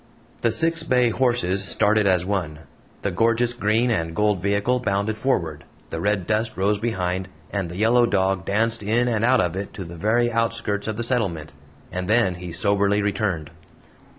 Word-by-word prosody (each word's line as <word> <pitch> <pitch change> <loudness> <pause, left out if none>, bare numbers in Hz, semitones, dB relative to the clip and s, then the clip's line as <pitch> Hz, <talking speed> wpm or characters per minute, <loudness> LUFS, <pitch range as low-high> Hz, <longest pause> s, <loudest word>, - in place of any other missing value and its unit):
The 115 - +2
six 165 +5 +2
bay 125 -6 +2
horses 115 -7 +1
started 105 +1 +2
as 90 -2 +3
one, 85 -6 -3 0.4
the 100 - 0
gorgeous 115 +4 +2
green 115 +1 +1
and 80 -5 -1
gold 105 -2 +1
vehicle 100 +6 +1
bounded 100 -2 -1
forward, 95 - -1 0.3
the - - -4
red 100 -3 0
dust 110 +2 -1
rose 100 +2 +1
behind, 95 -5 -2 0.2
and 100 -4 -2
the 85 - -7
yellow 120 +3 +4
dog 95 -2 +1
danced 110 +3 0
in 115 +4 +1
and 115 -3 0
out 125 +1 +4
of 90 -1 -1
it 100 +1 -5
to 95 - -5
the 85 0 -9
very 120 +6 +1
outskirts 115 -3 -1
of 110 -1 -3
the 120 - -2
settlement. 95 -11 -1 0.4
And 90 0 -4
then 110 -3 +3
he 90 -1 -6
soberly 100 +3 +1
returned. 95 -6 -2
105 Hz, 180 wpm, -23 LUFS, 95-115 Hz, 0.4 s, yellow